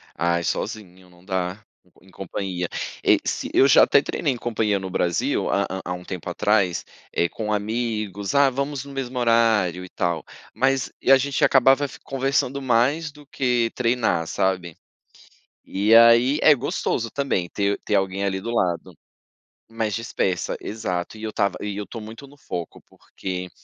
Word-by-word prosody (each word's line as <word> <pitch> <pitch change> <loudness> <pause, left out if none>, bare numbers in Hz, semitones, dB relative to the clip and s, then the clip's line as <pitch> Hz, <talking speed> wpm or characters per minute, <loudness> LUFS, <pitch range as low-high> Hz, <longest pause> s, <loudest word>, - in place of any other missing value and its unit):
Ai, 85 0 0
sozinho, 95 -4 -4
não 90 0 -21
dá, 95 +2 -3 0.4
e 90 - -22
em - - -18
companhia 95 -1 -4 0.4
e - - +5
se - - -2
eu 135 - +6
já 135 - +7
até - - +5
treinei 145 0 -1
em 125 - -3
companhia 110 -4 0
no 95 0 -6
Brasil 85 -2 0
há - - +2
há 95 +1 -5
há 90 - -2
um 90 0 -7
tempo 90 -2 -6
atrás, 95 0 +1 0.3
eh, 85 - +1
com 105 +3 -4
amigos, 105 -1 -2
ah, 140 -1 +6
vamos 140 +1 -3
no 140 - -10
mesmo 130 -2 -4
horário 110 -7 +2
e 90 - -10
tal, 85 -3 -2 0.3
mas 135 0 +1
e - - +3
a 135 - +9
gente 135 +1 -1
acabava 135 +1 +5
f 135 - -9
conversando 135 0 -1
mais 135 +6 +1
do 150 0 -16
que 125 -4 0
treinar, 115 -9 +1
sabe. 90 -3 -1 0.9
E 105 +3 +2
aí, 115 +4 +6
é 155 - +8
gostoso 120 -3 -2
também 135 -11 -1
ter 100 +2 -1
ter 105 - -1
alguém 95 0 0
ali 95 -1 -1
do 115 - -5
lado, 90 -6 -1 0.7
mas 110 -2 -2
dispersa, 95 -5 -2
exato 95 -2 -4
e 110 - -10
eu 110 - -3
tava 100 -1 0
e 105 -1 -4
eu 105 - -5
tô 115 - -7
muito 115 +6 -10
no 145 +1 -18
foco, 85 -10 -6
porque 90 -1 -7
110 Hz, 175 wpm, -23 LUFS, 95-125 Hz, 0.9 s, a